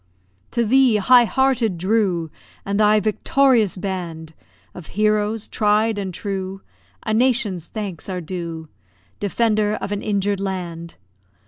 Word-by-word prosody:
To 235 - 0
thee, 255 0 +4
high 240 +4 +5
hearted 250 -6 +1
Drew! 185 -4 0 0.3
And 200 +1 -1
thy 215 0 +5
victorious 220 0 +2
band 170 -4 -5 0.4
Of 175 - -10
heroes 215 0 +1
tried 210 0 +1
and 195 -2 -3
true 195 0 -5 0.4
A 220 - -1
nation's 220 -7 +1
thanks 200 -6 -6
are 185 -1 -3
due. 165 -2 -6 0.5
Defender 210 0 +1
of - - -5
an 205 0 -2
injured 200 -1 -1
land! 175 -4 -5
205 Hz, 125 wpm, -21 LUFS, 185-220 Hz, 0.5 s, high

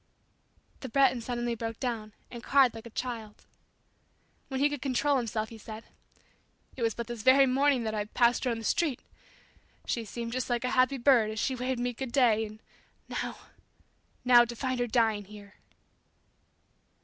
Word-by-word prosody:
The 260 - -7
Breton 260 -1 +3
suddenly 240 0 -2
broke 225 0 -5
down 225 -4 -3 0.2
and 235 - -8
cried 270 -3 +4
like 225 +1 -9
a - - -10
child. 225 -3 -6 1.0
When 265 -1 -3
he 285 - +4
could 290 -3 -5
control 280 +1 +1
himself 220 -3 -2
he 225 - -11
said, 220 +1 -9 0.9
"It 260 - -8
was 225 -2 +1
but 235 - -4
this 240 -1 -6
very 265 +4 +6
morning 270 -1 +2
that 220 -1 -2
I 210 -1 -2
passed 240 +4 +2
her - - +2
on 230 - -1
the 225 - -7
street. 285 +2 0 0.9
She 235 - -2
seemed 230 +2 -6
just 255 +1 -3
like 240 -1 0
a 250 - -1
happy 255 +1 +3
bird 240 -4 +4
as 215 - -6
she 265 - 0
waved 255 0 -2
me 245 0 -1
'good 255 +1 -6
day,' 225 -4 +3
and 215 +1 -13 0.5
now - - -4 0.9
now 245 -1 +8
to 240 0 -6
find 255 +1 -2
her 245 - 0
dying 220 -3 +1
here!" 205 0 -13
240 Hz, 180 wpm, -29 LUFS, 225-255 Hz, 1.0 s, now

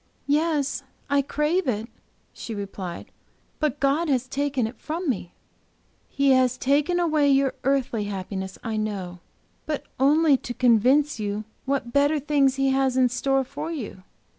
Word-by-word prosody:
"Yes, 295 -1 +1 0.3
I 280 0 +4
crave 300 +5 0
it," 225 -2 -1 0.5
she 225 - -7
replied, 195 -3 -6 0.5
"but 300 -2 0
God 290 +4 +1
has 255 -2 +1
taken 275 -2 -1
it 225 +3 -7
from 330 +3 -4
me. 185 -9 -2 0.8
"He 280 -1 +2
has 255 -1 +3
taken 295 +7 +2
away 310 -4 +2
your 270 -1 +3
earthly 265 -5 0
happiness, 190 -1 -5
I 225 -1 -2
know, 195 -5 -3 0.5
but 295 -2 -3
only 295 +1 +5
to 245 -1 -7
convince 255 +4 +3
you 205 0 -2 0.2
what 260 -3 -2
better 285 +2 +3
things 280 -2 +2
He 270 0 +1
has 265 -1 +1
in 255 -1 +4
store 270 +2 +1
for 290 +5 -6
you. 230 - -6
270 Hz, 150 wpm, -25 LUFS, 230-290 Hz, 0.8 s, only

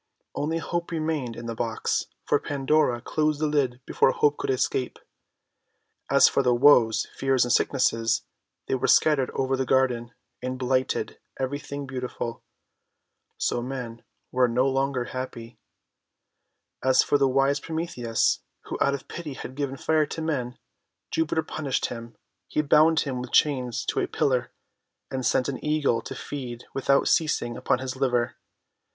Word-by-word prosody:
Only 160 +3 -1
Hope 170 +1 -3
remained 155 -7 -2
in 120 - -8
the 115 - -3
box, 115 0 -1 0.2
for - - +2
Pandora 140 -3 +1
closed 155 +2 0
the 155 - +1
lid 135 -4 0
before - - +3
Hope 145 +2 +2
could - - -3
escape. 130 -1 0 1.1
As - - +7
for - - +2
the 125 -2 +3
Woes, 120 -4 +5
Fears, 135 -2 +2
and 120 - +1
Sicknesses, 115 -4 +2 0.4
they - - -1
were 130 - +1
scattered 145 -5 +4
over 135 0 +1
the 130 - 0
garden, 125 -3 +1 0.3
and 130 +1 -3
blighted 130 0 -1 0.2
every 135 +2 -2
thing 140 0 -6
beautiful. 125 -3 -5 1.0
So 120 - 0
men 120 -2 -6 0.3
were 125 0 +3
no 125 +3 +2
longer 135 -2 0
happj'. 120 -2 -6 1.3
As 130 0 +5
for 145 - +2
the 135 - +4
wise 135 +2 +2
Prometheus, 160 -9 -1 0.2
who - - -6
out 140 - +3
of 140 - -9
pity 155 -5 -6
had 130 - -7
given 135 -1 -3
Fire 155 +1 +2
to 160 - -6
men, 130 -6 -2 0.5
Jupiter 160 0 0
punished 145 -3 -2
him. 115 -1 -8 0.3
He 150 - 0
bound 155 +2 +5
him 130 -3 -3
with 125 - -7
chains 130 -5 +2
to - - -1
a - - 0
pillar, 125 -3 0 0.6
and 130 -1 -2
sent 125 0 +2
an 140 - -4
Eagle 150 -6 +1
to - - -7
feed 125 -4 -6
without 140 +1 +2
ceasing 135 -7 +1
upon - - +1
his 130 0 -5
liver. 125 -3 0
130 Hz, 155 wpm, -26 LUFS, 125-145 Hz, 1.3 s, As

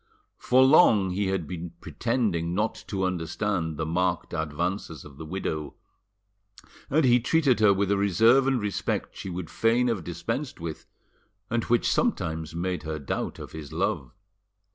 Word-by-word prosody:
For 130 +1 +4
long 115 - +5
he 100 +2 -1
had 95 -3 -1
been 85 +1 -6
pretending 100 -9 -1
not 105 +3 +1
to 95 -2 -2
understand 85 -1 -1
the 80 - -2
marked 90 +3 -1
advances 80 +2 -3
of 70 -2 -13
the 80 - -8
widow, 80 -4 -4 1.1
and 155 +1 +3
he 125 -1 +5
treated 130 0 +2
her 105 -2 +6
with 100 0 +1
a 100 - +3
reserve 115 +7 +4
and 135 -2 +2
respect 105 -2 -2
she 95 - -6
would 90 -2 -5
fain 120 +2 +2
have 105 -7 -1
dispensed 115 - -4
with, 80 -2 -6 0.6
and 115 -1 0
which 120 0 +2
sometimes 80 -1 -1
made 90 +1 -2
her 80 0 -4
doubt 70 - -3
of - - -9
his 80 -2 -8
love. 65 -3 -1
95 Hz, 160 wpm, -26 LUFS, 80-115 Hz, 1.1 s, her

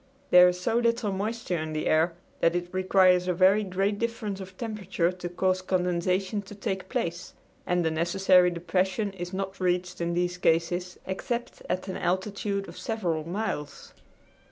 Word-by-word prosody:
There 180 0 +9
is 180 0 -3
so 225 +6 +1
little 235 -2 +1
moisture 200 -2 -2
in 155 0 -4
the 155 - -2
air 160 +2 +3 0.3
that 165 +1 +3
it 175 +1 -3
requires 185 -1 +4
a 180 - +1
very 190 +4 +5
great 195 +2 -1
difference 230 -4 -3
of 190 -1 -10
temperature 195 -6 -1
to 180 -1 -6
cause 185 +1 0
condensation 185 +2 0
to 200 +1 -11
take 190 -1 -4
place, 170 +1 -3 0.3
and 180 -1 +1
the 160 - +2
necessary 180 +2 +4
depression 190 +4 -1
is 175 -2 -6
not 195 0 -4
reached 180 -1 -1
in 170 0 -1
these 175 0 -1
cases 175 +2 +1
except 235 +6 -4
at 185 +1 -2
an 190 - -4
altitude 195 +2 -1
of - - -10
several 170 -8 -2
miles. 175 -7 -4
185 Hz, 165 wpm, -27 LUFS, 175-195 Hz, 0.3 s, There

